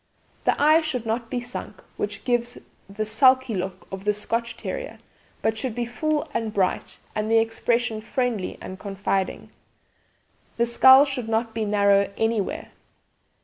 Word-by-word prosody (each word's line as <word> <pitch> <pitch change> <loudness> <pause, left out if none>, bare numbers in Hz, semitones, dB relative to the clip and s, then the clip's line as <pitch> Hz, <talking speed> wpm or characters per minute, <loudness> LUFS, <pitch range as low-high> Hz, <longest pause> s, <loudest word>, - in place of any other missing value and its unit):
The - - +2
eye 310 +3 +6
should 270 -7 -2
not 230 +1 -2
be 245 - -2
sunk, 245 +1 -7
which 205 0 -4
gives 240 0 0 0.3
the 215 +2 -3
sulky 255 +3 +4
look 190 -1 -4
of 190 0 -6
the 210 0 +1
'Scotch' 230 +2 -2
Terrier, - - -5 0.5
but 220 0 +1
should 240 -2 -3
be 240 -1 -1
full 300 +5 -1
and 225 -2 -1
bright, 195 -3 -1 0.2
and 215 0 -2
the 225 - +4
expression 225 0 0
friendly 225 -3 -2
and 185 0 -8
confiding. 195 -1 -2 1.1
The 235 - +3
skull 260 +4 +7
should 260 -5 -4
not 225 0 0
be 220 -1 -1
narrow 200 -1 +3
anywhere. 225 -3 -1
225 Hz, 150 wpm, -24 LUFS, 210-245 Hz, 1.1 s, skull